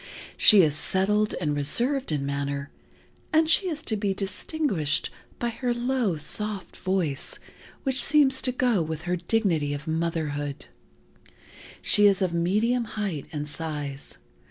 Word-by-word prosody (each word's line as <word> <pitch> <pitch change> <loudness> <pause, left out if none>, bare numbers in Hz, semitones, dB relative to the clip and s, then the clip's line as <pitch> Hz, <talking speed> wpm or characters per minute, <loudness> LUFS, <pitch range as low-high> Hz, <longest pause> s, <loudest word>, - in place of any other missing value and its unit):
She 205 -4 +8
is 150 -2 +2
settled 210 +6 0
and 150 -4 -1
reserved 245 - 0
in 145 -2 -1
manner, 140 0 -3 0.6
and 315 0 +4
she 370 +3 +3
is 310 -3 -3
to 220 - -1
be 200 -2 -1
distinguished 195 - -1 0.3
by 240 - -1
her 240 +1 -2
low, 240 -6 0
soft 210 +6 -4
voice 175 -6 -2 0.5
which 265 -1 +1
seems 280 -3 +4
to 255 - +1
go 245 -6 +1
with 160 0 -4
her 180 0 0
dignity 170 -6 0
of 145 +1 -8
motherhood. 155 -3 -2 1.2
She 205 -1 +5
is 195 -1 +3
of 180 -2 0
medium 215 +8 +1
height 200 -9 -4
and 150 -1 -4
size. 150 -3 -6
190 Hz, 140 wpm, -26 LUFS, 150-235 Hz, 1.2 s, She